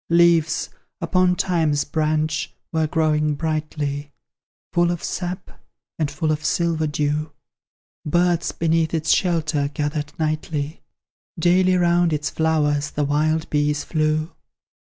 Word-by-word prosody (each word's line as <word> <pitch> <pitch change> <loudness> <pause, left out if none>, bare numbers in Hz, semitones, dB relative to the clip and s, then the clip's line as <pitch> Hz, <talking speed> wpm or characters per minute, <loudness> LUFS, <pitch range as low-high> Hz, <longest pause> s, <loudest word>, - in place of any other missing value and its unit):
Leaves, 170 -2 +3 0.3
upon 180 +1 +2
Time's 160 -6 +1
branch, 155 0 -1 0.2
were 160 -1 +1
growing 150 -2 +1
brightly, 150 -2 -3 0.6
Full 175 0 +3
of 175 -1 -3
sap, 180 0 -5 0.4
and 155 -3 +1
full 155 +2 -1
of 155 0 -2
silver 160 -1 +1
dew; 150 +1 -1 0.7
Birds 175 +2 +1
beneath 165 0 +1
its 155 -1 +1
shelter 155 -5 +1
gathered 150 0 -3
nightly; 155 -1 -2 0.6
Daily 180 +2 +3
round 175 -1 +3
its 150 0 -1
flowers 150 -2 +1
the 150 - -2
wild 155 +3 +1
bees 150 0 +1
flew. 155 0 0
155 Hz, 115 wpm, -22 LUFS, 150-170 Hz, 0.7 s, Leaves